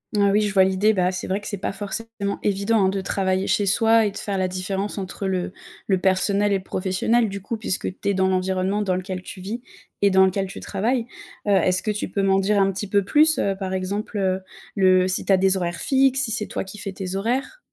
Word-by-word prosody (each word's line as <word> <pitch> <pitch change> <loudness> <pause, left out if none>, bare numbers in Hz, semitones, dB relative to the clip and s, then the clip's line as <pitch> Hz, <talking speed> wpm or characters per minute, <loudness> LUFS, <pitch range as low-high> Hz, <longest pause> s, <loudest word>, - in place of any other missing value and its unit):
Ah 200 -1 +4
oui, 210 +2 +3
je 205 -2 -1
vois 190 -1 +6
l'idée. 190 +3 +2
Bah, 180 -2 +1
c'est 185 - -5
vrai 195 +2 -1
que - - -8
c'est 205 - -4
pas 185 - -3
forcément 205 0 -4
évident, 200 +1 +2
hein, 190 - +3
de 195 0 -2
travailler 190 0 -1
chez 205 - +1
soi 225 +3 +4
et 205 - -1
de 195 - -9
faire 200 -2 -3
la 185 -1 +1
différence 190 +3 -3
entre 195 +1 -5
le 185 -1 -2 0.3
le 190 - +3
personnel 195 +2 +2
et 200 - +3
le - - -14
professionnel 195 +6 0
du 200 0 -6
coup, 225 +4 -4
puisque 190 -3 -2
tu - - -1
es - - +2
dans 190 0 +2
l'environnement 190 +2 0
dans 185 -2 0
lequel 185 0 -5
tu 185 - -9
vis 225 +6 -5 0.4
et 200 - +5
dans 190 0 +6
lequel 190 +1 0
tu 190 - -8
travailles. 230 +4 -1 0.4
Heu, - - +3
est-ce 185 -1 +3
que - - -3
tu 210 - -3
peux 200 - -1
m'en 195 0 +3
dire 200 +1 +2
un 195 0 +3
petit 195 +2 -4
peu 200 +1 +2
plus, 305 +10 +4
heu, 195 -1 0
par 190 -1 -4
exemple, 200 +3 -3
heu, 190 -1 0 0.3
le 185 -2 +4
si 185 - -1
tu 195 - +3
as - - +5
des 190 0 +3
horaires 175 -2 -3
fixes, 270 0 +3
si 225 - -4
c'est 215 -1 -1
toi - - -3
qui 195 +2 -10
fais 195 -1 -5
tes 185 0 -4
horaires? 245 - -2
195 Hz, 255 wpm, -23 LUFS, 190-210 Hz, 0.4 s, vois